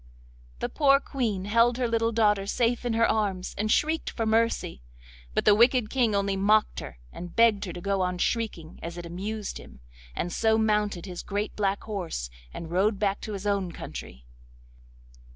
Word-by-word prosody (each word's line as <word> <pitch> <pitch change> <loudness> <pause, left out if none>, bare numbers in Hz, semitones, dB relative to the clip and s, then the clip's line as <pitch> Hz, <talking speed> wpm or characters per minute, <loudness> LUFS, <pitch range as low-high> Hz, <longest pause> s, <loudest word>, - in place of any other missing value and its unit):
The - - 0
poor 275 -2 +4
Queen 225 -10 -2
held 230 +3 +3
her 250 -1 0
little 230 0 +1
daughter 210 -3 +2
safe 240 +2 0
in 240 - 0
her 230 +1 +3
arms 200 -4 -1
and 215 +1 -1
shrieked 315 +2 +1
for 225 - -3
mercy, 225 - +1 0.5
but - - +1
the 210 - +7
wicked 235 0 +4
King 240 -6 +2
only 200 0 +1
mocked 210 +2 +2
her, - - -9 0.2
and 175 0 -8
begged 225 -3 +4
her 175 - -6
to 175 - -7
go 195 0 0
on 180 0 -1
shrieking, 195 -7 -2
as 170 +1 -6
it 175 - -6
amused 200 +5 -5
him, - - -14 0.4
and 175 - -3
so 220 -1 +3
mounted 210 -4 +1
his 180 -3 -6
great 205 +1 -3
black 200 -1 0
horse, 175 - -4 0.2
and 165 -1 -8
rode 200 +4 +2
back 200 0 0
to 215 - -5
his 200 0 -6
own 200 -3 0
country. 60 - -8
210 Hz, 185 wpm, -27 LUFS, 185-230 Hz, 0.5 s, the